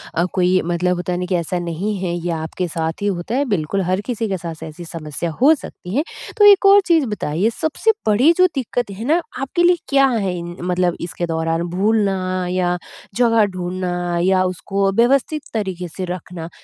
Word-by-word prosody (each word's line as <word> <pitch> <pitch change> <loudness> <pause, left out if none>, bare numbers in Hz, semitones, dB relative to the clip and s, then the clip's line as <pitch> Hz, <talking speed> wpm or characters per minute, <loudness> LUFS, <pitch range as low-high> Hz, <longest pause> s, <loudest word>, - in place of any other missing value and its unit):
अ, 170 - +2
कोई 185 0 +3
मतलब 175 +1 0
होता 180 0 -2
न 180 +1 -2
कि 185 - +1
ऐसा 175 +1 -1
नहीं 175 +5 -3
है 180 -2 -2
ये 175 0 -3
आपके 165 +3 -3
साथ 160 +1 -3
ही 205 - 0
होता 195 +4 -2
है 280 +2 +1
बिल्कुल, 195 - -1
हर 185 +2 0
किसी 225 0 -3
के 195 -2 -2
साथ 165 -2 -7
ऐसी 160 +2 -8
समस्या 165 0 -5
हो 290 +5 +7
सकती 185 -8 -8
है। 290 - +2 0.3
तो 415 - +6
एक 400 0 +4
और 395 +1 +8
चीज़ 330 -5 +3
बताइए 205 -3 -1
सबसे 315 - +1 0.2
बड़ी 235 +9 +5
जो 365 0 +6
दिक्कत 245 -4 -2
है 200 +3 -7
न 335 - +4 0.2
आपके 285 +6 0
लिए 350 0 +5
क्या 275 -1 +5
है 210 -7 0
इन 175 0 -6
मतलब 180 0 0
इसके 175 0 -3
दौरान 165 0 -1
भूलना 190 -3 +1
या 180 -1 0 0.4
जगह 230 -3 +4
ढूँढना 175 -1 -2
या 185 0 +3
उसको 195 +2 0
व्यवस्थित 265 +8 +2
तरीक़े 190 -5 -3
से 185 - -2
रखना? 170 -1 -8
185 Hz, 195 wpm, -20 LUFS, 175-230 Hz, 0.4 s, और